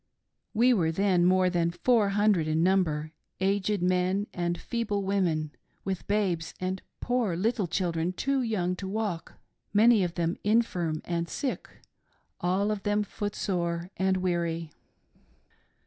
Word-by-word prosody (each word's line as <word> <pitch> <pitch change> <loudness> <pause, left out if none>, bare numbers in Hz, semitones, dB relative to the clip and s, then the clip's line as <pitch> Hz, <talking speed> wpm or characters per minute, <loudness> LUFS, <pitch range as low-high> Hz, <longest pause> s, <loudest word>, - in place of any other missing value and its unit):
We 245 +3 +5
were 165 -7 +2
then 185 0 +2
more 185 0 +4
than 175 -2 +1
four 215 +4 +2
hundred 205 -6 +3
in 155 +1 +1
number 160 -5 +1
— - - -52
aged 200 0 +1
men 185 +2 +1
and 175 -1 -1
feeble 210 -3 -2
women, 175 -6 0 0.3
with 190 -2 -3
babes 185 -6 0
and 185 +1 -2 0.2
poor 245 -7 0
little 210 0 0
children 170 -1 -1
too 275 +8 0
young 190 -7 0
to 190 - -5
walk; 200 -4 -3 0.4
many 220 -1 +6
of 175 -1 -2
them 170 0 -1
infirm 185 -8 +1
and 170 -1 -2
sick, 270 - -3 0.7
all 190 +4 +1
of 210 -2 -2
them 205 +1 +1
footsore 180 -4 -3
and 190 0 +1
weary. 170 -3 -1
185 Hz, 140 wpm, -28 LUFS, 170-205 Hz, 0.7 s, many